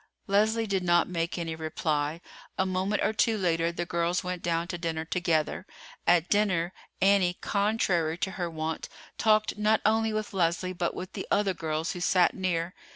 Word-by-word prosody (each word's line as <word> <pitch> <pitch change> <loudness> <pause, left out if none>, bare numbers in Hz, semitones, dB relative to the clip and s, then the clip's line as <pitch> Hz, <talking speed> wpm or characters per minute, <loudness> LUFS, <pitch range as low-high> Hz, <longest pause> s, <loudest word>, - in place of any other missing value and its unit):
Leslie 220 +3 +2
did 195 -3 -1
not 175 -1 +3
make 170 -1 -2
any 165 -2 -3
reply. 155 0 -2 0.4
A 190 - +2
moment 190 +2 0
or - - +1
two 220 +1 +2
later 170 -3 +1
the 175 0 -3
girls 170 +1 0
went 180 -1 -4
down 170 0 -1
to 175 - -3
dinner 160 -1 -2
together. 170 +1 0 0.4
At 175 -1 +4
dinner, 185 -4 +1 0.3
Annie, 190 -2 +3
contrary 195 -6 +1
to 190 - -2
her 175 -2 -3
wont, 160 0 -4 0.3
talked 215 -1 +2
not 215 +1 +3
only 220 +1 +3
with 215 -1 -3
Leslie 180 0 0
but 175 -1 -2
with 180 - -7
the - - -5
other 200 -2 +2
girls 160 -1 -2
who 180 - -6
sat 180 0 +3
near. 180 -2 -1
180 Hz, 175 wpm, -28 LUFS, 165-200 Hz, 0.4 s, At